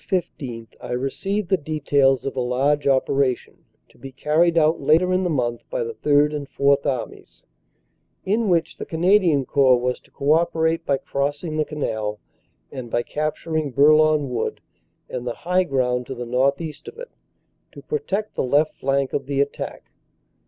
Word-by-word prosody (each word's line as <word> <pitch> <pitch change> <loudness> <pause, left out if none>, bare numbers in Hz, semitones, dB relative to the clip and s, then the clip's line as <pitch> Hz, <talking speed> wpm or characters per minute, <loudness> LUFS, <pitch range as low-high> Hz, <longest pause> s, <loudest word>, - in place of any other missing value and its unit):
15 130 - -3
I - - -5
received 180 +10 -2
the 190 - +3
details 140 -4 +1
of 135 - -3
a - - -2
large 135 +4 +1
operation 135 -1 0 0.2
to - - -25
be 135 - -9
carried 160 +5 +2
out 160 0 +3
later 165 +6 +3
in 185 +1 +1
the 180 - 0
month 120 -6 -1
by - - -2
the 460 0 -5
Third 150 - +2
and 145 -2 -5
Fourth 140 0 +2
Armies, 130 -4 -5 0.8
in 215 +2 +1
which 165 -2 +1
the - - -6
Canadian 170 -4 +3
Corps 130 -4 +4
was 125 0 -1
to - - -26
co 140 +2 -1
operate 165 0 +1
by 140 - +2
crossing 145 +4 -3
the 155 - +1
Canal, 110 -9 -3 0.5
and 130 -3 -7
by 120 +1 0
capturing 155 +2 -2
Bourlon 155 +2 +4
Wood 120 -3 -2 0.5
and 125 -1 -5
the 120 - -3
high 180 +2 +1
ground 125 -4 0
to 135 - -5
the 120 0 -5
northeast 140 - -1
of 435 +1 -9
it, - - -9 0.6
to - - -12
protect 215 - -3
the - - -2
left 145 +4 +2
flank 135 0 0
of 135 -1 -2
the 140 -1 -1
attack. 140 0 -3
145 Hz, 170 wpm, -22 LUFS, 130-165 Hz, 0.8 s, Corps